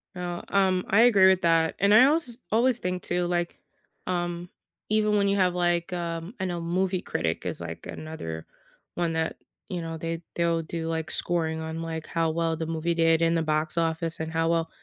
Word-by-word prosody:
No, 175 -1 -4
um, 190 -2 +2
I 205 +4 +5
agree 205 -6 +7
with 190 -1 +2
that, 165 -1 +3
and 200 +1 +4
I 240 +4 +9
also 290 -4 +1
s - - -15
always 240 +2 +3
think 180 0 -2
too, 175 0 0
like, 175 -1 -1 0.5
um, 175 -1 -2 0.4
even 215 -1 +2
when 200 -1 +3
you 200 - +2
have, 180 -2 +3
like, 175 0 0
um 170 +2 -4
I 190 - -1
know 175 -1 -2
Movie 185 +2 0
Critic 80 0 -2
is, - - -4
like, - - -7
another 80 - -6 0.5
one 170 -2 0
that 160 0 -1 0.3
you 175 -3 -3
know, 165 0 -5
they 165 +1 -4
they'll 170 -1 +1
do, 165 0 -4
like, 160 -1 -2
scoring 160 -2 0
on, 160 +1 -4
like, 160 -1 -4
how 165 -1 0
well 165 0 0
the 160 - -3
movie 165 +1 -1
did 165 0 +3
in 165 0 +3
the 165 - +2
box 155 +1 -1
office, 165 0 -1
and 160 0 -3
how 165 0 +1
well 165 -1 +1
170 Hz, 205 wpm, -26 LUFS, 165-185 Hz, 0.5 s, I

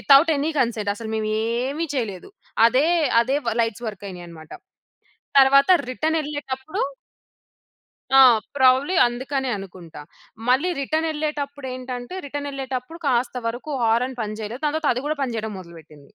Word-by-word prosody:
Without 285 +4 +6
any 295 +3 0
consent. 225 -4 0
అసలు 220 +1 -7
మేమేమి 230 +8 -1
చేయలేదు. 225 - -4 0.4
అదే, 255 +6 +3 0.4
అదే 265 +4 0 0.3
లైట్స్ 230 +1 -3
వర్క్ 205 -2 -9
అయినాయన్నమాట. 170 -4 -11 0.9
తరువాత 275 +5 +5 0.2
రిటర్న్ 315 +5 0
వెళ్ళేటప్పుడు 290 +3 -5 1.4
ఆ! - - +10 0.3
ప్రాబబ్లీ 265 +5 +4
అందుకనే 260 +2 -2
అనుకుంటా. 180 -5 -10 0.5
మళ్ళీ 270 +9 +3
రిటర్న్ 315 +4 0
వెళ్ళేటప్పుడు 290 -2 -4
ఏంటంటే, 255 +2 -6
రిటర్న్ 285 +1 -5
వెళ్ళేటప్పుడు 270 +3 -5
కాస్త 250 -1 +1
వరకు 240 +6 -6
హారన్ 245 +3 +1
పని 215 0 -4
చేయలేదు. 225 +6 -6
దాని 300 0 0
తర్వాత 315 -3 +1
అది 250 - -3
కూడా 305 0 -2
పని 250 -3 -2
చేయడం 220 -1 -4
మొదలుపెట్టింది. 160 -5 -15
255 Hz, 135 wpm, -23 LUFS, 220-285 Hz, 1.4 s, ఆ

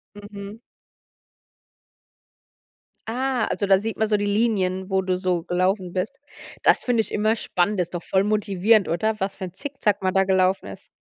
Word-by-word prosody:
Mhm. 205 +1 -9 2.5
Ah, 260 +1 0
also 200 - -1
da 195 -1 +5
sieht 220 +2 -4
man 220 - +1
so 210 -1 +1
die 205 - -1
Linien, 200 -3 0
wo 190 0 +2
du, 185 -1 -1
so, 180 -2 -1
gelaufen 185 +1 0
bist. 215 +9 -3 0.4
Das - - +4
finde 245 -2 +2
ich 220 - -2
immer 215 +2 +1
spannend, 195 -1 0
ist 175 0 -3
doch 175 - -3
voll 190 - +1
motivierend, 210 0 +2
oder? 215 +7 -1
Was 195 0 -2
für - - -6
'n 180 -1 -8
Zick-Zack 215 -6 -2
man 185 0 +1
da 195 0 +3
gelaufen 190 0 +2
ist. - - -10
200 Hz, 175 wpm, -23 LUFS, 185-215 Hz, 2.5 s, da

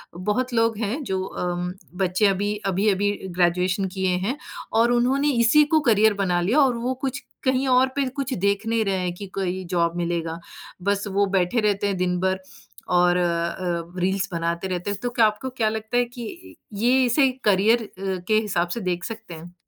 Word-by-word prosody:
बहुत 210 +7 -1
लोग 225 -1 +2
हैं 230 +7 -2
जो 190 -4 -2
अम, 180 -1 -3 0.2
बच्चे 185 +2 +1
अभी, 205 +2 0
अभी-अभी 200 +1 +2 0.2
ग्रेजुएशन 180 +2 +1
किए 190 -1 0 0.2
हैं 260 +6 -1 0.4
और 235 +1 +4
उन्होंने 265 +4 +2
इसी 270 +6 +6
को 315 - +6
करियर 220 -2 +4
बना 190 -3 0
लिया 225 +12 +2
और 260 -4 +4
वो 250 +2 -1
कुछ 265 - -2 0.2
कहीं 260 0 +1
और 255 +1 +4
पे 280 -1 +1
कुछ 275 -2 -2
देख 200 +2 +1
नहीं 225 -1 +1
रहे 195 -1 0
हैं 180 -1 -2
कि 200 - -7
कोई 185 -1 -2
जॉब 170 -1 +1
मिलेगा, 170 -1 -2 0.4
बस 200 +1 0
वो 200 +1 +2
बैठे 190 +5 +2
रहते 205 -1 +1
हैं 195 -2 -1
दिन 180 0 0
भर 190 0 0 0.5
और 180 0 +3
अ, 170 -1 0 0.4
रील्स 190 +2 0
बनाते 170 +2 -2
रहते 180 +1 -3
हैं। 200 - -4
तो 245 - 0
क्या 235 -2 +3
आपको 215 +5 -1
क्या 230 -4 0
लगता 220 +2 -3
है 245 - +3
कि 245 +9 -9 0.2
ये 245 +5 +3
इसे 260 +3 +3
करियर 215 +4 +3
अ, - - -9 0.4
के 215 - +2
हिसाब 180 -5 -1
से - - -3
देख 180 -1 -2
सकते 225 -6 -7
हैं? 170 +2 -10
200 Hz, 190 wpm, -23 LUFS, 180-235 Hz, 0.5 s, इसी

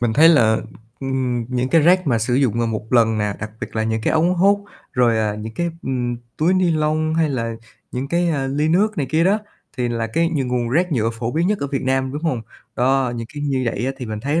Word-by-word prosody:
Mình 120 -2 +1
thấy 155 +6 +7
là, 120 -10 +5
ừm, - - -2 0.4
ừm, 130 -3 -1
những 125 0 -1
cái 165 +4 +4
rác 180 +3 +4
mà 120 -5 +2
sử 120 +2 0
dụng 125 -4 +2
mà 120 - +1
1 110 0 -4
lần 115 -2 +4
nè, 105 -1 -1
đặc 110 - -5
biệt - - -6
là 110 - +1
những 110 0 -1
cái - - +1
ống 170 +3 +3
hút 200 +3 +3 0.3
rồi, 120 -3 +3
à, 105 -1 0
những 110 +1 -7
cái, 170 +5 -1
ừm, 125 -2 -2 0.2
túi 170 +4 +2
ni 185 -2 +2
lông 155 0 0
hay 160 -1 +2
là 115 -3 -2 0.4
những 130 +2 -3
cái, 175 +2 +1
à, 140 -4 0
ly 145 +3 0
nước 205 +6 +2
này 140 - 0
kia 160 +1 +3
đó 200 +4 +3 0.4
thì 125 -2 0
là 115 -1 -1
cái 165 +9 +1
nh 140 -6 -1
nguồn 125 -1 -1
rác 170 +7 +1
nhựa 115 -4 +1
phổ 115 +1 -4
biến 165 +3 +1
nhất 205 +1 +1
ở 140 - -2
Việt 135 -1 -3
Nam, 130 0 0
đúng 145 +2 -5
hông? 135 -9 -1 0.3
Đó, 130 0 +2
những 115 -1 -5
cái 145 - -5
như 135 -3 0
vậy 115 +1 -1
á 135 - -1
thì 125 -2 -6
mình 110 -1 -5
thấy 145 +7 0
130 Hz, 265 wpm, -20 LUFS, 115-160 Hz, 0.4 s, thấy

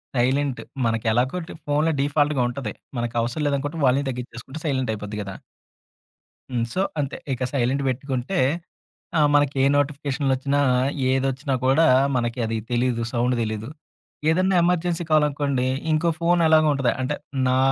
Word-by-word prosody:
టైలెంటు 130 +2 +1 0.2
మనకెలాగో 115 +6 +1
డీఫ్ 160 - -10
ఫోన్‌లో 150 +2 +2
డిఫాల్ట్‌గా 145 -1 +1
ఉంటది, 120 -4 -5 0.2
మనకవసరం 120 +4 -1
లేదనుకుంటే 145 +3 -2
వాల్యూమ్ 135 +2 +2
తగ్గిచ్చేసుకుంటే, 125 +3 -7
సైలెంటైపోద్ది 110 -7 -2
గదా! 95 -1 -7 1.1
హ్మ్. 120 -3 -1
సో, 185 - 0 0.2
అంతే, 140 -1 -4 0.2
ఇక 130 - -4
సైలెంటు 135 +1 +1
బెట్టుకుంటే 130 +5 -2 0.8
ఆహ్, 150 -1 +4
మనకే 145 -2 +2
నోటిఫికేషన్‌లొచ్చినా, 140 -1 0 0.5
ఏదొచ్చినా 135 +1 0
కూడా, 135 +5 +4 0.3
మనకి 120 0 -1
అది 115 0 -2
తెలీదు, 120 -1 +1
సౌండు 125 +1 +1
దెలీదు. 110 0 -3 0.6
ఏదన్నా 185 +3 +2
ఎమర్జెన్సీ 175 -1 +1
కాలనుకోండి, 145 -4 +2 0.3
ఇంకో 160 +2 +2
ఫోనెలాగో 165 -2 +4
ఉంటద. 135 -3 +1
అంటే, 145 +3 -2 0.3
నా 130 0 +2
135 Hz, 120 wpm, -23 LUFS, 125-150 Hz, 1.1 s, ఆహ్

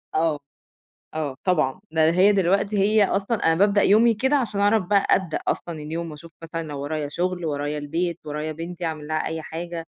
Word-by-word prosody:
آه، 160 -2 +1 0.7
آه، 150 -4 -3
طبعًا 160 -3 +1
ده 160 0 +4
هي 190 +4 +5
دلوقتي 200 +2 +1
هي 210 +1 +4
أصلًا 200 +4 -1
أنا 165 0 +4
بابدأ 200 +2 +3
يومي 225 +3 +5
كده 265 +7 +1
عشان 220 -7 0
اعرف 205 0 +3
بقى 200 +1 +2
أبدأ 180 -4 -2
أصلًا 165 -3 -2
اليوم، 160 +2 -5
واشوف 160 +2 -11
مثلًا 165 0 -4
لو 145 -2 -6
ورايا 145 0 -3
شغل، 180 +1 -2
ورايا 145 0 -2
البيت، 165 +4 -2
ورايا 150 +1 -4
بنتي، 170 +2 -6
أعمل 155 -2 -4
لها 155 0 -1
أي 160 0 -4
حاجة، 165 +1 -6
170 Hz, 185 wpm, -24 LUFS, 155-195 Hz, 0.7 s, هي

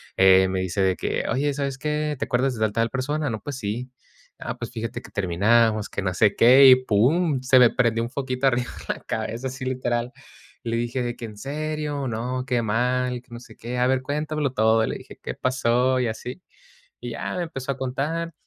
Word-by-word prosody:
eh, 95 0 +6
me 95 0 -2
dice 95 +2 -2
de 95 -1 +2
que: - - -2
"Oye, 145 +2 0
¿sabes 140 -2 -3
qué? 150 0 -1
¿Te - - -1
acuerdas 130 +1 +1
de 110 - -2
al 110 - +1
tal 115 +2 0
persona?". 145 +1 -1
"No, 110 - -4
pues 140 -3 -6
sí". 120 +3 -4 0.5
"Ah, - - -6
pues - - -5
fíjate 115 -2 -5
que - - -13
terminamos, 105 +4 +2
que 100 - -4
no 95 - -1
sé 100 +3 +3
qué", 130 +3 +8
y 130 - +10
pum, 130 - +2
se 130 0 +4
me 125 -2 +7
prendió 115 -1 +1
un 120 - -5
foquito 130 -1 -2
arriba 125 -2 +2 0.2
en - - 0
la - - -16
cabeza, 120 +4 -4
así 130 0 -6
literal. 125 -1 -1 0.5
Y 120 - -4
le 115 - 0
dije 120 +2 -2
de 120 0 -3
que: 120 - -7
"¿En 105 -2 -9
serio? 150 +2 -3
No, 125 +3 -3
qué 125 -3 0
mal, 125 +3 0
que 125 - -31
no 120 - -7
sé 115 -2 -15
qué. 125 +2 -4
A 125 - +3
ver, 130 0 +1
cuéntamelo 150 0 -2
todo". 110 -2 +3
Le - - -3
dije: - - -13
"¿Qué - - -5
pasó?", 130 0 +1
y 125 - +1
así. 125 +9 -6 0.6
Y 120 -1 -5
ya 115 - -4
me 175 - -1
empezó 140 -5 -4
a 135 - -5
contar, 150 +6 -3
125 Hz, 225 wpm, -24 LUFS, 115-135 Hz, 0.6 s, y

